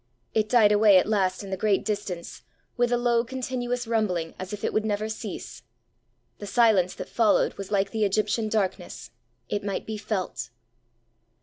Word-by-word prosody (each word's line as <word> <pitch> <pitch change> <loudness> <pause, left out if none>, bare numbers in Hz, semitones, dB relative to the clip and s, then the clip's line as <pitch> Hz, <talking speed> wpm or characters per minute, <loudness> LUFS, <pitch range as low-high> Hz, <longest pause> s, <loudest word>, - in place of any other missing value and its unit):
It 215 -1 +1
died 225 -4 +5
away 210 -2 +6
at 185 - +4
last 195 -3 0
in 195 - -8
the - - 0
great 205 0 +1
distance, 200 -5 -4 0.3
with 245 0 +1
a 245 - +3
low 240 -1 +2
continuous 245 -1 -3
rumbling 205 -8 -1
as 185 0 -6
if 205 -1 -6
it - - -1
would 215 - +1
never 215 0 -1
cease. 220 - -7 0.8
The 205 - -7
silence 210 -6 +3
that - - -7
followed 225 -3 +2
was 195 -1 -8
like 200 -1 +1
the 220 -1 0
Egyptian 210 +2 +1
darkness; 200 -4 -2 0.4
it 205 - -2
might 200 -1 -3
be 220 -1 -4
felt. 200 - -3
210 Hz, 175 wpm, -26 LUFS, 195-225 Hz, 0.8 s, away